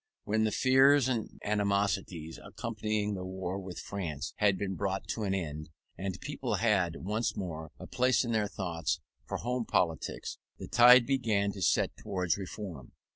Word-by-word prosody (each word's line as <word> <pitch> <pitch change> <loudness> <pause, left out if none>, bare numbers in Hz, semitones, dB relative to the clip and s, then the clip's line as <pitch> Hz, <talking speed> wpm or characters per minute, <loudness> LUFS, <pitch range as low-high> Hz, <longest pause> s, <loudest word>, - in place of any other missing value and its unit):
When 110 +1 +1
the 110 - +1
fears 135 +2 +5
and 120 -4 -2
animosities 100 -5 0
accompanying 105 -1 -2
the 95 -2 -4
war 95 0 -4
with 95 -2 -8
France 85 -6 -4
had 100 -2 +3
been 95 0 -2
brought 95 0 -2
to 110 - -2
an 95 -1 0
end, 75 -4 -4 0.3
and 95 0 -4
people - - -2
had 95 -7 +2
once 105 +5 -2
more 80 -4 -5
a - - -9
place 125 -1 +2
in 120 - -2
their 110 -2 +1
thoughts 85 -3 -2 0.3
for - - -2
home 125 0 -1
politics, 90 -7 -1 0.2
the - - -7
tide 125 +1 +8
began 110 -7 +1
to 100 - -8
set - - +2
towards 90 -4 -1
reform. 95 - -7
100 Hz, 165 wpm, -31 LUFS, 90-110 Hz, 0.3 s, tide